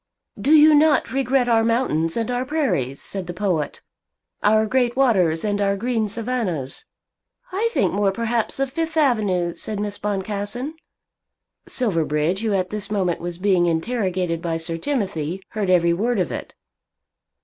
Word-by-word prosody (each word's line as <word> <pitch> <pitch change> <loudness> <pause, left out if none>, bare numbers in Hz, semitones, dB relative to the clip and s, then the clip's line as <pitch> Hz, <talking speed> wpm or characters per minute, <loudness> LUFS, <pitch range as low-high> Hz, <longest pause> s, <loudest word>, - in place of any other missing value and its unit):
"Do - - -1
you 310 0 +8
not 300 -2 +3
regret 265 -1 +1
our 225 -2 +3
mountains 225 -9 +1
and 230 +1 -1
our 245 +1 0
prairies," 205 - -1
said 190 -3 -5
the 175 - -6
poet; 180 -7 -2 0.6
"our 215 +1 +4
great 245 +1 +1
waters 190 -11 +2
and 205 -1 0
our 200 0 +1
green 225 -1 -1
savannahs?" 210 - -3 0.7
"I 420 +5 0
think - - +1
more 200 -1 +2
perhaps 230 +3 -1
of 275 -1 0
Fifth 325 +2 -3
Avenue," 205 - +2
said 210 +3 -4
Miss 205 0 -4
Boncassen. 205 +7 -3 0.9
Silverbridge, 165 - 0
who 220 -1 -1
at 185 -2 -1
this 210 -2 -4
moment 190 -5 0
was 175 0 -5
being 185 -2 +2
interrogated 180 -2 -1
by 165 -1 -1
Sir 165 0 -3
Timothy, 190 - -2
heard 210 -4 -2
every 170 -2 +4
word 230 +7 0
of 180 - 0
it. - - -6
205 Hz, 155 wpm, -22 LUFS, 175-245 Hz, 0.9 s, you